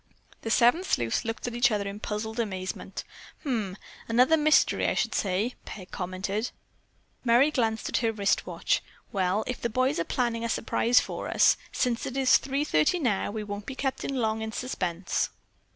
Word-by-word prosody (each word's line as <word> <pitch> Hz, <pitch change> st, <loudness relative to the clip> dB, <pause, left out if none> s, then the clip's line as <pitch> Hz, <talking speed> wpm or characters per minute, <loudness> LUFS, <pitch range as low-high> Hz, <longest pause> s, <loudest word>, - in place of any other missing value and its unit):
'" -, -, -28 dB
The 225 Hz, -, -4 dB
seven 245 Hz, +10 st, +4 dB
sleuths 120 Hz, -, 0 dB
looked 225 Hz, 0 st, -4 dB
at 245 Hz, -, -3 dB
each 240 Hz, +3 st, +4 dB
other 205 Hz, -3 st, -1 dB
in 200 Hz, +1 st, -6 dB
puzzled 220 Hz, +2 st, -4 dB
amazement. 190 Hz, -4 st, -4 dB, 0.4 s
"Hum! 220 Hz, -, -2 dB, 0.3 s
Another 250 Hz, +7 st, +5 dB
mystery, 310 Hz, 0 st, +3 dB
I -, -, +1 dB
should -, -, 0 dB
say," 200 Hz, +5 st, 0 dB
Peg 185 Hz, -3 st, -9 dB
commented. 190 Hz, +4 st, -3 dB, 0.7 s
Merry 250 Hz, +5 st, +5 dB
glanced 225 Hz, -6 st, 0 dB
at -, -, 0 dB
her 230 Hz, -2 st, +1 dB
wrist 205 Hz, -2 st, 0 dB
watch. -, -, 0 dB, 0.3 s
"Well, 190 Hz, +2 st, +1 dB
if 250 Hz, -, -4 dB
the 235 Hz, -, 0 dB
boys 255 Hz, +1 st, +1 dB
are -, -, +2 dB
planning 235 Hz, +2 st, -1 dB
a 230 Hz, -, -1 dB
surprise 235 Hz, +2 st, +3 dB
for -, -, -4 dB
us, -, -, +5 dB, 0.2 s
since 240 Hz, -2 st, 0 dB
it 260 Hz, -, -5 dB
is 265 Hz, -2 st, +6 dB
three 275 Hz, +2 st, -1 dB
thirty 155 Hz, -, +2 dB
now, 240 Hz, -, 0 dB
we 215 Hz, +1 st, -4 dB
won't 205 Hz, 0 st, -6 dB
be 270 Hz, -, -5 dB
kept 265 Hz, 0 st, -2 dB
long 220 Hz, -5 st, 0 dB
in 220 Hz, 0 st, -3 dB
suspense." 185 Hz, -8 st, -2 dB
225 Hz, 185 wpm, -27 LUFS, 205-250 Hz, 0.7 s, is